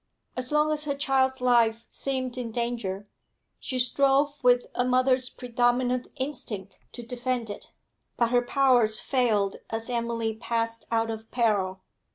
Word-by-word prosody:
As 255 +1 -1
long 300 +1 +3
as 305 0 -2
her 285 -1 -1
child's 265 -2 +1
life 235 -2 +3
seemed 260 -2 -2
in 245 -2 -4
danger, 225 -4 -3 0.5
she 260 - -4
strove 275 +3 +3
with 245 0 +4
a 245 - +1
mother's 255 0 +2
predominant 245 0 0
instinct 255 -8 -5
to 240 - -7
defend 245 -1 -2
it; - - -10 0.5
but 235 -1 +2
her 245 -1 +4
powers 245 -4 +3
failed 220 -7 +1
as 225 +2 -3
Emily 230 -1 -1
passed 230 0 -3
out 225 0 +1
of 220 0 -7
peril. 195 -6 0
245 Hz, 145 wpm, -27 LUFS, 230-255 Hz, 0.5 s, with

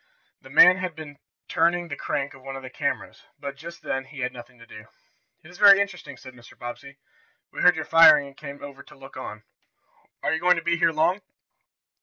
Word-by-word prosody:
The - - -15
man 180 +1 +7
had 180 -3 -5
been 145 -3 -11 0.3
turning 170 +1 +1
the 145 - -6
crank 145 -2 -4
of 135 - -16
one 135 +1 -8
of 135 - -9
the 130 - -9
cameras, - - -4
but, 140 -1 -7
just 170 +4 -11
then, 135 0 -3
he 135 0 -10
had 125 0 -3
nothing 120 0 -13
to 115 - -16
do. 110 -1 -13 0.6
"It 155 - -15
is 180 - -15
very 200 -1 +8
interesting," 200 -2 -4
said 130 -1 -13
Mr. 120 -1 -17
Bobbsey. 130 +3 -9 0.5
"We - - -6
heard 180 0 +5
your 160 - -5
firing 160 -3 +6
and 140 -1 -14
came 140 -1 -10
over 140 -1 -10
to - - -17
look 135 0 -14
on. 110 -4 -8 0.8
Are - - 0
you 160 - -1
going 180 +1 +3
to 165 - -4
be 170 0 +1
here 165 - +2
long?" 160 +5 0
145 Hz, 220 wpm, -24 LUFS, 135-170 Hz, 0.8 s, very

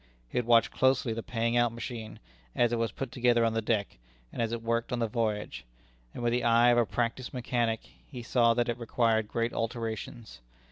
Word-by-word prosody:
He - - -1
had 120 - -3
watched 115 -1 +5
closely 130 -3 +2
the 115 - -4
paying 115 0 -1
out 120 -1 +3
machine, 115 -2 -7 0.4
as 120 -1 +2
it 120 - 0
was 115 -1 0
put 135 -3 -5
together 120 -2 +3
on 115 - +1
the 115 - 0
deck, 105 - -1 0.3
and - - -3
as 115 -1 0
it 115 -1 -4
worked 115 0 -1
on 125 - 0
the 115 - +1
voyage, 110 -2 -2 0.5
and 120 - -5
with 120 - +2
the 125 0 0
eye 120 +1 +5
of 120 0 +4
a 115 - +2
practised 120 +2 -2
mechanic, 120 -2 -1 0.3
he 125 -4 -8
saw 115 -1 +3
that 120 +1 +1
it 120 0 -2
required 115 -2 +1
great 115 +2 -2
alterations. 115 - -5
115 Hz, 215 wpm, -29 LUFS, 115-120 Hz, 0.5 s, watched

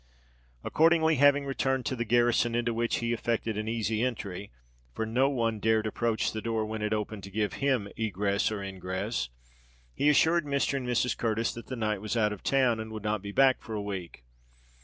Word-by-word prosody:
Accordingly, 160 -1 +3
having 145 +1 +5
returned 135 -1 -1
to 130 - -1
"the 120 -1 -2
garrison," 120 0 +2
into 120 0 0
which 115 +1 0
he 120 0 -1
effected 115 -1 -1
an 105 +1 -3
easy 110 -1 -1
entry—for 65 - -5
no 125 +5 +2
one 115 -5 -1
dared 110 +1 +2
approach 110 +1 0
the 110 - -4
door 110 -1 -1
when 110 0 -5
it 105 0 -1
opened 105 -1 -3
to - - -9
give 105 +1 -1
him 130 -7 +1
egress 100 -1 0
or 105 -2 -4
ingress—he 60 - -4
assured 160 +2 +4
Mr. 140 -1 0
and 130 -2 -4
Mrs. 125 0 +1
Curtis 115 0 -1
that 115 - -9
the 130 - -4
knight 110 -4 -1
was 110 +2 -2
out 105 -2 +2
of 105 - -9
town, 130 -4 +2
and 110 0 -6
would 110 -1 -6
not 105 -1 -1
be 100 0 -6
back 135 +4 +4
for 110 - -6
a - - -2
week. 95 -9 -6
110 Hz, 195 wpm, -29 LUFS, 100-120 Hz, -, having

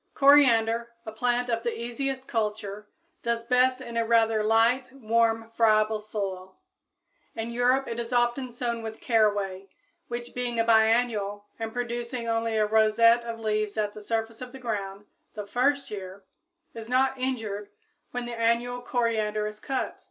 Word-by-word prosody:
_ - - -43
Coriander, 235 -5 +5 0.2
a 220 - -5
plant 245 +2 0
of 230 0 0
the 235 0 -3
easiest 260 +3 -4
culture, 210 -2 -3 0.3
does 235 0 -2
best 255 +1 +3
in 235 -2 -6
a 230 - +3
rather 225 -1 +3
light, 230 +4 +3
warm, 225 -2 0
friable 215 -1 +3
soil. 195 -3 -5 0.8
In 225 +1 -4
Europe 250 +3 +2
it 230 - -4
is 235 0 -5
often 245 +1 +1
sown 235 -1 -3
with 220 0 -7
caraway, 205 -4 +1 0.4
which, 240 0 -6
being 245 -2 -2
a - - +4
biennial 220 -2 +2
and 225 0 -3
producing 240 0 -4
only 225 -1 0
a 215 - +3
rosette 220 +2 +4
of 230 -1 -5
leaves 215 -1 -1
at 210 -1 -1
the 215 - -10
surface 225 +1 -3
of 250 -1 -7
the 265 - -9
ground 205 -4 -4 0.3
the 210 -1 -5
first 270 +6 0
year, 195 -1 -7 0.5
is 225 0 -8
not 260 +1 +2
injured 220 -6 -3 0.4
when 245 0 -4
the 240 - -5
annual 235 +2 0
coriander 220 -4 0
is 210 0 -6
cut. 265 +3 -3
230 Hz, 160 wpm, -27 LUFS, 215-245 Hz, 0.8 s, Coriander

